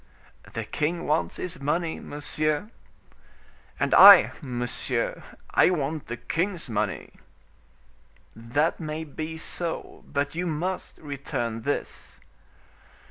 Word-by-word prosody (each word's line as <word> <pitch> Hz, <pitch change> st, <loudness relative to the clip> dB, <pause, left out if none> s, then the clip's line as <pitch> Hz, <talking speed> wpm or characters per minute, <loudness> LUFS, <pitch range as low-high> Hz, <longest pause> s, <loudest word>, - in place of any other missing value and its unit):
"The -, -, -3 dB
king 170 Hz, +3 st, -2 dB
wants 155 Hz, +2 st, 0 dB
his 180 Hz, -4 st, -5 dB
money, 160 Hz, +3 st, -1 dB
monsieur." 155 Hz, +6 st, -2 dB, 1.1 s
"And -, -, +1 dB
I, -, -, +10 dB
monsieur, 120 Hz, -2 st, -2 dB, 0.3 s
I -, -, +5 dB
want 155 Hz, -3 st, -2 dB
the 120 Hz, -, -5 dB
king's 175 Hz, -, -2 dB
money." 110 Hz, -4 st, -2 dB, 1.2 s
"That 120 Hz, +8 st, 0 dB
may 155 Hz, -1 st, -4 dB
be 160 Hz, +1 st, -6 dB
so; 170 Hz, +1 st, -4 dB
but 140 Hz, 0 st, -2 dB
you 175 Hz, +2 st, -2 dB
must 175 Hz, +4 st, -3 dB
return 125 Hz, -6 st, -4 dB
this." 145 Hz, +5 st, -4 dB
150 Hz, 105 wpm, -26 LUFS, 140-165 Hz, 1.2 s, I